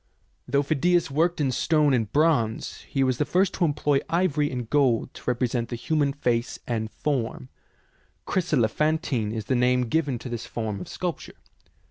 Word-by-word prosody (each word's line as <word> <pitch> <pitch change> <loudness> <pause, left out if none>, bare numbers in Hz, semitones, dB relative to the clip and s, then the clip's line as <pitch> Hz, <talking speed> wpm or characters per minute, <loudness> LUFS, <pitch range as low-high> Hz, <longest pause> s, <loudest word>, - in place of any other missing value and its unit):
Though 140 +2 +2
Phidias 155 +3 +1
worked 165 +4 +1
in 140 -3 +1
stone 150 +2 +2
and 115 -4 0
bronze, 145 -8 +1
he 135 -2 +1
was 130 -2 0
the - - +3
first 185 +5 +1
to 180 - +1
employ 145 -2 +1
ivory 160 -4 +1
and 125 -4 -4
gold 130 -4 +2
to - - -11
re 125 - +2
present 120 -1 -1
the 120 - -3
human 145 +3 0
face 120 -4 -1
and 110 -2 -2
form. 115 - -3 0.8
Chryselephan 155 - +1
tine 115 -9 -2
is 110 -1 -4
the 130 - 0
name 125 0 +3
given 145 -4 0
to 125 - -8
this 120 -2 -5
form 110 -4 -4
of - - -7
sculpture. 180 -3 -5
135 Hz, 175 wpm, -25 LUFS, 120-155 Hz, 0.8 s, the